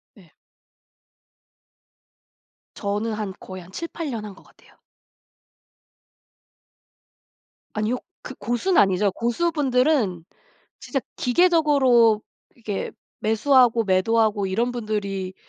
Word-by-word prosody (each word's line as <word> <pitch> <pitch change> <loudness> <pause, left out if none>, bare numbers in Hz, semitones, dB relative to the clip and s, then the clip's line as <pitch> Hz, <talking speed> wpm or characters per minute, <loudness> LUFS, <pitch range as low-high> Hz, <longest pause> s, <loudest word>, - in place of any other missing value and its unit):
네. 185 -7 -20 2.4
저는 210 +2 -2
한 210 -3 -4
거의 185 -1 -9
한 175 +2 -15
7-8 335 - -5
년 220 -2 -5
한 205 - -8
것 - - -18
같아요. - - -23 3.0
아니요. 215 +4 -1 0.2
그 265 - -9
고수는 240 - +1
아니죠. 195 0 +2
고수분들은 250 - +1 0.6
진짜 265 +1 -2 0.2
기계적으로 260 -8 +4 0.3
이렇게 215 -5 -4 0.3
매수하고 230 +1 +3
매도하고 205 +1 +2
이런 235 +6 0
분들이 200 -5 -3
225 Hz, 200 characters per minute, -23 LUFS, 200-255 Hz, 3.0 s, 기계적으로